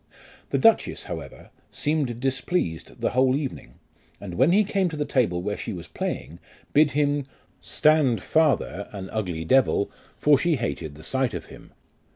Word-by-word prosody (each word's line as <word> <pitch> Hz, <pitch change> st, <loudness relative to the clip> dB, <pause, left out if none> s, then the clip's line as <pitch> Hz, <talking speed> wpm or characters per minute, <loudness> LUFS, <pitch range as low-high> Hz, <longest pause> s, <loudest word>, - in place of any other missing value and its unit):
The -, -, +1 dB
duchess, 225 Hz, -1 st, +3 dB
however, -, -, -8 dB, 0.2 s
seemed 145 Hz, -6 st, -1 dB
displeased 130 Hz, -, -2 dB
the -, -, +1 dB
whole 130 Hz, +1 st, +3 dB
evening, 135 Hz, -, -5 dB, 0.4 s
and 95 Hz, -3 st, -7 dB
when 130 Hz, -, +4 dB
he 205 Hz, +4 st, +5 dB
came 195 Hz, -2 st, 0 dB
to 155 Hz, -, -6 dB
the 150 Hz, -, -1 dB
table 90 Hz, -12 st, +1 dB
where 105 Hz, +1 st, -2 dB
she 110 Hz, -, -5 dB
was 85 Hz, -2 st, -7 dB
playing, 85 Hz, +2 st, -5 dB, 0.3 s
bid 150 Hz, +1 st, +5 dB
him, 145 Hz, -2 st, +1 dB, 0.2 s
" -, -, -37 dB, 0.2 s
Stand 150 Hz, -6 st, +4 dB
farther, 140 Hz, -, +1 dB
an 95 Hz, -2 st, -7 dB
ugly 90 Hz, -7 st, -3 dB
devil, 130 Hz, -1 st, +3 dB, 0.3 s
for 145 Hz, -2 st, +4 dB
she 170 Hz, -2 st, +2 dB
hated 85 Hz, -, -4 dB
the 75 Hz, -, -13 dB
sight 130 Hz, +6 st, 0 dB
of -, -, -5 dB
him." -, -, -14 dB
130 Hz, 170 wpm, -25 LUFS, 100-150 Hz, 0.4 s, he